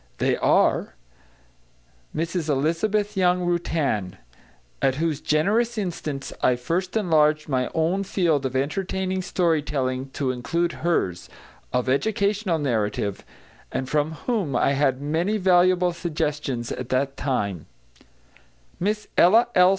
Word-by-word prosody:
They - - +1
are: - - +2 1.2
Mrs 165 0 -2
Elizabeth 195 +9 0
Young 180 -1 +2
Rutan, 155 - -1 0.6
at 130 - +2
whose 155 -1 -1
generous 220 +10 +1
instance 155 -8 -4
I 125 - +3
first 175 - -2
enlarged 155 -6 +2
my 130 -3 0
own 170 +5 +1
field 165 -8 +1
of 130 - -8
entertaining 185 +6 -1
story 170 -4 +1
telling 135 -2 -2
to 135 -3 -1
include 170 +8 -1
hers, 95 - -1 0.4
of 125 0 0
educational 200 +5 +1
narrative, 105 -7 -1 0.5
and 130 - -2
from 150 +2 0
whom 200 - 0
I 120 - +3
had 135 -1 +1
many 170 +8 0
valuable 180 -1 +3
suggestions 150 -8 -3
at 125 -1 -5
that 135 +1 0
time; 100 - -2 1.1
Miss 210 +3 -1
Ella 220 +8 +6
L. 180 0 +6
160 Hz, 120 wpm, -24 LUFS, 135-185 Hz, 1.2 s, Ella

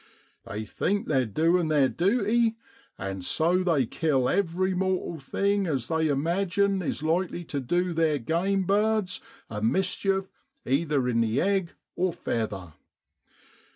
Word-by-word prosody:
They 105 +2 -5
think 200 - -1
they're 130 -5 +2
doin' 165 - +2
theer 145 -3 +4
duty, 225 - +1 0.4
and 95 -1 -5
so 170 - +2
they 160 -8 +2
kill 135 0 0
every 185 +1 +1
mortal 185 -3 -1
thing 200 +8 0
as 135 -7 -2
they 160 -1 +1
imagine 185 +6 +1
is 155 - -3
likely 175 +2 0
tu 145 -3 -3
du 175 +7 0
theer 160 -2 +2
game 175 +9 0
birds 205 0 +1 0.3
a 105 -1 -5
mischief 190 - 0 0.3
either 140 -1 +1
in 115 -2 +2
the 115 0 +1
egg 190 -2 0 0.2
or 180 -1 0
feather. 100 -8 -3
170 Hz, 135 wpm, -27 LUFS, 135-190 Hz, 0.4 s, theer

